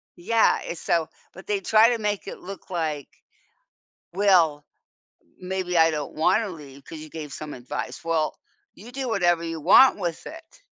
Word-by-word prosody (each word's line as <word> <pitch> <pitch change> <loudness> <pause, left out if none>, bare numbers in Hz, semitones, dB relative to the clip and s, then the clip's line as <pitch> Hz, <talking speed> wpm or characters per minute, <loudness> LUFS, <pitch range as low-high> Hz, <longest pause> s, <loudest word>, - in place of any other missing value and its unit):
Yeah, 225 +6 +2
it's 170 - -6
so 165 -2 0 0.3
but 190 - -13
they 205 -1 0
try 220 +4 +5
to 235 -2 -1
make 210 -2 -2
it - - -7
look 195 +1 -10
like, 155 -5 -3 1.1
"Well, 175 -7 +3 0.8
maybe, 185 -1 -3
I 160 0 +5
don't 150 -2 -5
wanna 190 +6 +1
leave 140 -4 -12
'cause 160 - -9
you 155 -1 -11
gave 150 -3 -8
some 155 -1 -7
advice." 130 +6 -6
"Well, 160 -2 -1 0.4
you 235 +5 -13
do 265 -1 -4
whatever 175 -5 +1
you 165 -1 -5
want 210 - +6
with 170 -4 -4
it, 325 +9 -12
175 Hz, 165 wpm, -24 LUFS, 155-205 Hz, 1.1 s, want